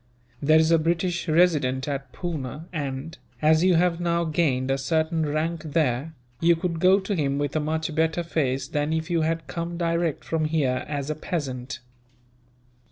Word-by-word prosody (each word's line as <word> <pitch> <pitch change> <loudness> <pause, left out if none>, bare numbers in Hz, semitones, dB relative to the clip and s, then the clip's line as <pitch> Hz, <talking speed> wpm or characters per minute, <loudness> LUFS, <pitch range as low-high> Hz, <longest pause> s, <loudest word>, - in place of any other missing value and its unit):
There 155 +2 +5
is 160 +1 +4
a 165 - +5
British 170 +2 0
Resident 150 -6 +2
at 135 -2 -4
Poona 155 -3 -5
and, 145 0 -4 0.2
as 155 +2 +4
you 185 -1 +5
have 170 0 +2
now 170 0 +1
gained 145 -5 +1
a 135 - 0
certain 160 +2 0
rank 155 +2 -1
there, 155 -1 -1 0.2
you 170 +1 +4
could 165 0 -3
go 185 +3 +5
to 195 +1 -3
him 140 -6 0
with 145 0 -2
a - - +3
much 160 +1 -2
better 160 +2 +1
face 135 -5 -1
than 150 0 -1
if 160 +2 -2
you 170 -1 +2
had 165 +1 -1
come 170 0 -4
direct 170 -2 0
from 160 -1 -1
here, 145 -5 0
as 145 0 -3
a - - -2
peasant. 135 -7 -4
160 Hz, 175 wpm, -25 LUFS, 145-170 Hz, 0.2 s, There